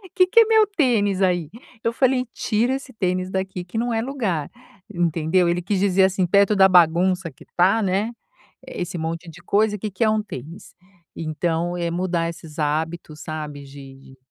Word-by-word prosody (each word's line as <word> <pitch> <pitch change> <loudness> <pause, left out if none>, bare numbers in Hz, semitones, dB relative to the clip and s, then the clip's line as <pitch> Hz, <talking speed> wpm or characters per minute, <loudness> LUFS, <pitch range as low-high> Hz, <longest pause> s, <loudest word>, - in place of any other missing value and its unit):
Que 365 -1 +5
que 460 +5 +5
é - - +5
meu 440 0 +5
tênis 230 - +1
aí?". 175 -5 +1 0.3
Eu 230 - +1
falei: 255 +1 +1
"Tira 240 +4 0
esse 270 -1 -8
tênis 185 -3 -1
daqui, 190 -1 -4
que 180 +5 -7
não 240 +1 0
é 225 - 0
lugar, 225 - -2 0.4
entendeu." 170 0 +1
Ele 175 +1 0
quis 190 +2 -1
dizer 190 -1 +4
assim, 190 -1 +1
perto 200 +3 +3
da 190 -1 +6
bagunça 180 +1 +3
que 130 - -18
tá, 190 +6 +4
né, 200 +3 0 0.6
esse 180 0 -5
monte 165 +1 -4
de 175 +2 -13
coisa, 210 +2 +1
que 210 +1 -5
que 190 +5 -1
é - - +3
um 215 0 +1
tênis? 160 - -10 0.4
Então, 165 +2 -2
é 170 -1 -2
mudar 170 -1 -1
esses 165 -2 -10
hábitos, 155 +1 -2
sabe, 150 -3 -6
de 135 -1 -12
de 135 0 -17
185 Hz, 185 wpm, -22 LUFS, 165-210 Hz, 0.6 s, da